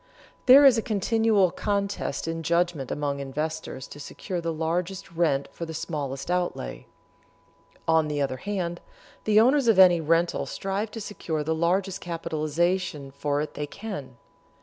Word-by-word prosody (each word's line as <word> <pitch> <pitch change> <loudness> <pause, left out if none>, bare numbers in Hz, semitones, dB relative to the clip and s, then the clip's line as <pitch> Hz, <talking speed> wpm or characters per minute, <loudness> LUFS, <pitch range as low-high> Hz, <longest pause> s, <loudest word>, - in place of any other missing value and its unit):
There 275 +3 +9
is 250 -4 +7
a - - 0
continual 215 -2 +2
contest 200 -8 -2
in 165 0 -3
judgment 170 -4 0
among 145 -1 -2
investors 140 -1 -4
to 145 - -10
secure 175 +5 -5
the 165 0 -2
largest 170 +4 -2
rent 160 -5 +1
for 170 - -6
the 160 - -6
smallest 150 -2 -4
outlay. 175 - -2 1.0
On 160 -1 +4
the 150 -1 -2
other 135 -2 -1
hand, 175 0 -3 0.4
the 215 0 +5
owners 260 +3 +4
of 225 -4 +5
any 180 -3 +7
rental 165 +2 +1
strive 195 +3 -3
to 225 - -7
secure 165 -6 -3
the 160 +2 0
largest 185 +4 0
capitalization 165 -2 -1
for 145 +1 -1
it 150 - -3
that - - -10
they 150 - -2
can. 145 - -7
170 Hz, 155 wpm, -26 LUFS, 150-195 Hz, 1.0 s, There